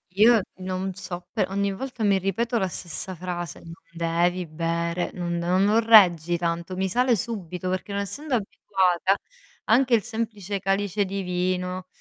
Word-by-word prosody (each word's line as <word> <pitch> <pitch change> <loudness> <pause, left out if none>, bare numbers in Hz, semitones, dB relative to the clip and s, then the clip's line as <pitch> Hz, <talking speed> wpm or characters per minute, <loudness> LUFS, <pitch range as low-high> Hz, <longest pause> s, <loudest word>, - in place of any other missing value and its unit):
io 220 +2 +6 0.2
non 185 +1 -3
so, 180 -2 -7
pe 215 - +1
ogni 200 +1 0
volta 250 +1 -5
mi 200 -2 +4
ripeto 230 +6 -1
la 190 - +1
stessa 180 +2 -5
frase: 175 -2 -5
"Non 165 - -11 0.2
devi 170 +2 0
bere, 170 +2 -2
non 175 -1 -3
non 180 +3 +2
non 215 +3 +4
reggi 175 -6 +6
tanto." 170 +1 -2
Mi 190 0 0
sale 245 +5 +2
subito, 185 -5 -4
perché 185 +2 -3
non 200 0 -1
essendo 260 +8 -3
abituata 195 -3 +1 0.5
anche 250 +3 +3
il 220 -3 +4
semplice 220 -4 -4
calice 200 +1 0
di 195 +1 -3
vino, 180 0 -2
190 Hz, 160 wpm, -25 LUFS, 175-205 Hz, 0.5 s, io